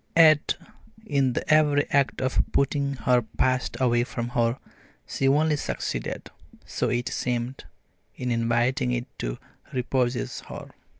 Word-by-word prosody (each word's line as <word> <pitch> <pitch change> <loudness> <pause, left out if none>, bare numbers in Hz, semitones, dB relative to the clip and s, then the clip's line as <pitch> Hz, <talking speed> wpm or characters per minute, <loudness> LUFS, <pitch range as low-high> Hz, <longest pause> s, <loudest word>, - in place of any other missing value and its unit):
Yet, 155 -2 +6 0.5
in 140 - +1
the - - -1
very 150 -2 +4
act 140 -2 +2
of 130 - +2
putting 140 0 +1
her 125 -1 +5
past 130 +3 -1
away 120 -2 +3
from 120 -1 -4
her, 120 0 +1 0.5
she 135 - 0
only 150 +2 +3
succeeded, 65 - -4 0.3
so - - -1
it 120 +1 -1
seemed, 125 +1 -3 0.5
in 125 -1 -3
inviting 120 +3 +1
it 120 0 -2
to - - -3 0.3
repossess 125 0 -1
her. - - -8
130 Hz, 130 wpm, -26 LUFS, 120-140 Hz, 0.5 s, Yet